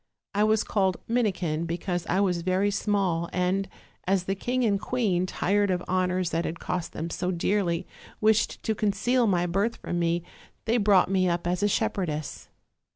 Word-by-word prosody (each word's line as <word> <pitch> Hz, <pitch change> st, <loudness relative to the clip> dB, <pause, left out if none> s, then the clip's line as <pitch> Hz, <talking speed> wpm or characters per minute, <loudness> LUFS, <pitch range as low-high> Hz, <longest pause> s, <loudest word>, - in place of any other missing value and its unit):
I 205 Hz, +1 st, +2 dB
was 215 Hz, 0 st, +3 dB
called 190 Hz, -3 st, +1 dB
Minikin 180 Hz, -9 st, 0 dB
because 175 Hz, +1 st, -3 dB
I 190 Hz, +3 st, +2 dB
was 180 Hz, -3 st, +1 dB
very 185 Hz, +3 st, +1 dB
small, 195 Hz, -5 st, 0 dB
and 185 Hz, +2 st, 0 dB, 0.4 s
as 190 Hz, -1 st, +2 dB
the 195 Hz, -, -1 dB
king 250 Hz, +6 st, -1 dB
and 200 Hz, -4 st, +1 dB
queen, 200 Hz, -9 st, 0 dB
tired 200 Hz, +2 st, +1 dB
of 180 Hz, -1 st, 0 dB
honors 185 Hz, -1 st, 0 dB
that 165 Hz, +1 st, 0 dB
had 170 Hz, -, -4 dB
cost 175 Hz, -2 st, -3 dB
them 165 Hz, +2 st, -4 dB
so 180 Hz, -, -2 dB
dearly, 175 Hz, -1 st, 0 dB, 0.3 s
wished 220 Hz, +1 st, +2 dB
to 220 Hz, -, +1 dB
conceal 220 Hz, +4 st, +1 dB
my 175 Hz, -3 st, +2 dB
birth 200 Hz, +6 st, 0 dB
from 175 Hz, -, -4 dB
me, 170 Hz, 0 st, 0 dB, 0.4 s
they 230 Hz, +2 st, +2 dB
brought 200 Hz, -4 st, +4 dB
me 185 Hz, -1 st, +2 dB
up 170 Hz, 0 st, -1 dB
as 180 Hz, +2 st, 0 dB
a 205 Hz, -, +3 dB
shepherdess. 180 Hz, -8 st, -2 dB
185 Hz, 175 wpm, -27 LUFS, 175-205 Hz, 0.4 s, brought